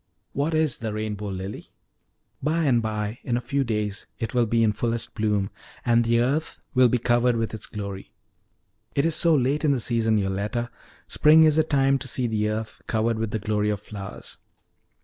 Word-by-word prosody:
"What 150 Hz, +4 st, 0 dB
is 155 Hz, -4 st, +1 dB
the 110 Hz, -2 st, -3 dB
rainbow 105 Hz, -1 st, -4 dB
lily?" 95 Hz, +1 st, -6 dB, 0.7 s
"By 160 Hz, +4 st, +1 dB
and 125 Hz, -6 st, +3 dB
by, 110 Hz, 0 st, -3 dB
in 120 Hz, -1 st, -1 dB
a -, -, 0 dB
few 135 Hz, +3 st, -1 dB
days, 105 Hz, -4 st, -2 dB
it 115 Hz, -, -4 dB
will 120 Hz, -2 st, +2 dB
be 115 Hz, +1 st, +2 dB
in 110 Hz, -, +4 dB
fullest 115 Hz, +2 st, -1 dB
bloom, 105 Hz, -2 st, 0 dB, 0.3 s
and 120 Hz, -1 st, +4 dB
the 115 Hz, 0 st, +2 dB
earth 140 Hz, +7 st, -1 dB
will 125 Hz, -1 st, +5 dB
be 125 Hz, -, +2 dB
covered 120 Hz, +1 st, +2 dB
with 115 Hz, -2 st, -2 dB
its 110 Hz, -, -6 dB
glory." 100 Hz, -2 st, -7 dB, 0.8 s
"It 140 Hz, -, +2 dB
is 165 Hz, -, +1 dB
so 165 Hz, 0 st, +4 dB
late 140 Hz, +3 st, +1 dB
in 145 Hz, -2 st, +3 dB
the 130 Hz, -, 0 dB
season, 115 Hz, -1 st, +1 dB
Yoletta! 100 Hz, +4 st, -2 dB, 0.4 s
Spring 155 Hz, +1 st, +6 dB
is 155 Hz, -1 st, +4 dB
the 160 Hz, -, +5 dB
time 135 Hz, -3 st, +2 dB
to 135 Hz, -, -5 dB
see 130 Hz, 0 st, +1 dB
the 105 Hz, -2 st, 0 dB
earth 110 Hz, +1 st, -4 dB
covered 110 Hz, 0 st, 0 dB
with 110 Hz, -1 st, -1 dB
the 110 Hz, -, -2 dB
glory 105 Hz, 0 st, 0 dB
of 105 Hz, -2 st, -1 dB
flowers." 100 Hz, -1 st, -9 dB
115 Hz, 195 wpm, -25 LUFS, 105-130 Hz, 0.8 s, Spring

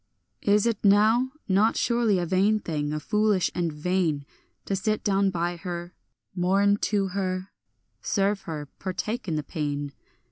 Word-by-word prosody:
Is 205 Hz, +1 st, +3 dB
it 230 Hz, -3 st, -1 dB
now 215 Hz, +5 st, +4 dB, 0.2 s
not 205 Hz, +3 st, +3 dB
surely 235 Hz, -4 st, +2 dB
a 175 Hz, -, 0 dB
vain 195 Hz, +5 st, +3 dB
thing, 150 Hz, -7 st, -3 dB
a 155 Hz, -, -2 dB
foolish 210 Hz, +2 st, +1 dB
and 170 Hz, -2 st, -1 dB
vain, 155 Hz, -2 st, -1 dB, 0.4 s
To 195 Hz, -, -1 dB
sit 215 Hz, +2 st, -1 dB
down 195 Hz, -1 st, +2 dB
by 175 Hz, -1 st, -2 dB
her, 175 Hz, 0 st, -6 dB, 0.4 s
mourn 195 Hz, +3 st, +3 dB
to 200 Hz, -2 st, +1 dB
her, 185 Hz, 0 st, -3 dB, 0.5 s
serve 200 Hz, 0 st, 0 dB
her, 150 Hz, -2 st, -5 dB
partake 210 Hz, +4 st, -3 dB
in 165 Hz, -, -1 dB
the 150 Hz, -, -2 dB
pain? 145 Hz, -3 st, -3 dB
190 Hz, 150 wpm, -26 LUFS, 170-205 Hz, 0.5 s, now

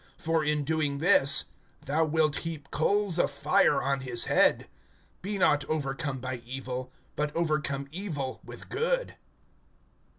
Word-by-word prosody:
For, 165 Hz, -1 st, 0 dB
in 150 Hz, 0 st, 0 dB
doing 150 Hz, -1 st, -1 dB
this, 140 Hz, -4 st, +5 dB, 0.4 s
Thou 155 Hz, +4 st, +1 dB
wilt 155 Hz, -1 st, +1 dB
heap 160 Hz, -4 st, -6 dB
coals 195 Hz, +2 st, +1 dB
of -, -, +3 dB
fire 140 Hz, 0 st, +2 dB
on 140 Hz, 0 st, 0 dB
his 125 Hz, -3 st, -1 dB
head. -, -, +3 dB, 0.5 s
(21)Be 200 Hz, +2 st, -3 dB
not 150 Hz, -6 st, +3 dB
overcome 145 Hz, -1 st, -2 dB
by 130 Hz, 0 st, -4 dB
evil, 130 Hz, +1 st, -6 dB, 0.2 s
but 150 Hz, 0 st, -1 dB
overcome 150 Hz, -4 st, -1 dB
evil 155 Hz, -8 st, -4 dB
with -, -, -11 dB
good. -, -, -1 dB
150 Hz, 135 wpm, -28 LUFS, 135-165 Hz, 0.5 s, this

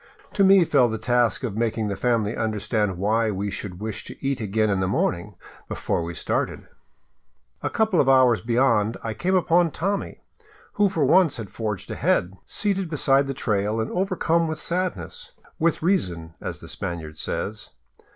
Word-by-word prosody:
To 200 Hz, -, +3 dB
me 190 Hz, -2 st, +6 dB
fell 130 Hz, -6 st, +4 dB
the 110 Hz, -, -2 dB
task 120 Hz, 0 st, +1 dB
of 115 Hz, -6 st, -3 dB
making 110 Hz, -1 st, -1 dB
the 100 Hz, -, -2 dB
family 115 Hz, -2 st, 0 dB
understand 105 Hz, -3 st, -1 dB
why 110 Hz, +4 st, +1 dB
we 100 Hz, 0 st, -2 dB
should 95 Hz, -2 st, -6 dB
wish 110 Hz, 0 st, -4 dB
to -, -, -9 dB
eat 135 Hz, -3 st, 0 dB
again 110 Hz, 0 st, +1 dB
in 95 Hz, -, +1 dB
the 95 Hz, -, 0 dB
morning, 95 Hz, +1 st, -1 dB, 0.3 s
before -, -, -2 dB
we 85 Hz, 0 st, -5 dB
started. -, -, -2 dB, 1.0 s
A -, -, -1 dB
couple 220 Hz, -6 st, +2 dB
of 135 Hz, -, +1 dB
hours 130 Hz, -6 st, +5 dB
beyond, 115 Hz, -2 st, +2 dB
I 115 Hz, -, -3 dB
came 185 Hz, -, 0 dB
upon 175 Hz, -1 st, +3 dB
Tommy, 195 Hz, +6 st, -3 dB, 0.5 s
who 205 Hz, -2 st, +3 dB
for 160 Hz, -6 st, +1 dB
once 160 Hz, 0 st, +4 dB
had 110 Hz, -5 st, -7 dB
forged 105 Hz, -4 st, -4 dB
ahead, 90 Hz, +2 st, +1 dB
seated 195 Hz, -4 st, -1 dB
beside 140 Hz, -2 st, +2 dB
the 135 Hz, -, -3 dB
trail 105 Hz, -1 st, 0 dB
and 110 Hz, -, -2 dB
overcome 170 Hz, -3 st, +1 dB
with 160 Hz, -1 st, -3 dB
sadness. 185 Hz, -, -3 dB, 0.3 s
With 165 Hz, 0 st, +1 dB
reason, 85 Hz, -, 0 dB
as -, -, -5 dB
the -, -, -10 dB
Spaniard 80 Hz, -3 st, -6 dB
says. 105 Hz, +9 st, -4 dB
115 Hz, 170 wpm, -24 LUFS, 105-165 Hz, 1.0 s, me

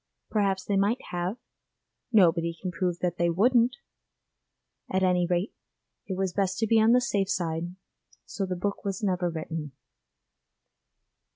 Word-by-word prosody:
Perhaps 195 Hz, -3 st, +1 dB
they 200 Hz, -, +1 dB
might 205 Hz, +5 st, +2 dB
have; 180 Hz, +5 st, -2 dB, 0.7 s
nobody 170 Hz, -5 st, +3 dB
can 185 Hz, -, -4 dB
prove 180 Hz, -1 st, -1 dB
that 175 Hz, -1 st, -1 dB
they 170 Hz, 0 st, +3 dB
wouldn't. 240 Hz, +7 st, +3 dB, 1.2 s
At 190 Hz, 0 st, +1 dB
any 180 Hz, -1 st, +3 dB
rate, 180 Hz, +4 st, 0 dB, 0.5 s
it 190 Hz, -, -3 dB
was 190 Hz, -2 st, -1 dB
best 190 Hz, -1 st, 0 dB
to 225 Hz, -, +1 dB
be 225 Hz, 0 st, +4 dB
on 225 Hz, +2 st, +5 dB
the 250 Hz, -, +6 dB
safe 200 Hz, -6 st, 0 dB
side, 170 Hz, -1 st, -2 dB, 0.5 s
so 195 Hz, -2 st, -3 dB
the 185 Hz, -, -2 dB
book 200 Hz, +3 st, -3 dB
was 195 Hz, +1 st, -3 dB
never 180 Hz, -3 st, +1 dB
written. 160 Hz, -3 st, -5 dB
185 Hz, 150 wpm, -27 LUFS, 175-205 Hz, 1.2 s, the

